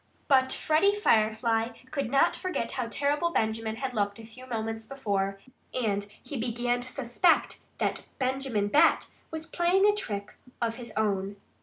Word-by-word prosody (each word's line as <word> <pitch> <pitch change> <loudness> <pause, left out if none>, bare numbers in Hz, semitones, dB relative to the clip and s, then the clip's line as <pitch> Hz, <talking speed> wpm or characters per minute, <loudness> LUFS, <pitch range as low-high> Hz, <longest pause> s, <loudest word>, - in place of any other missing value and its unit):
But 260 -2 +4
Freddie 360 +7 +3
Firefly 225 - +2
could 280 -6 -2
not 275 - +4
forget 370 -10 -2
how 250 -3 -2
terrible 290 +7 +1
Benjamin 220 -5 -1
had 255 +2 -4
looked 205 -2 0
a 225 - -10
few 255 +3 -13
moments 225 -2 -3
before. 200 -7 -1 0.4
And 205 -4 0 0.2
he 285 - -6
began 240 +1 0
to 250 - -3
suspect 275 +7 +2 0.2
that - - -1
Benjamin 260 -5 0
Bat 295 - +4 0.2
was 320 0 -6
playing 355 +3 +2
a 415 - +5
trick 205 - -4 0.3
of 230 -1 -1
his 235 -2 -7
own. 200 -2 0
240 Hz, 155 wpm, -28 LUFS, 220-275 Hz, 0.4 s, a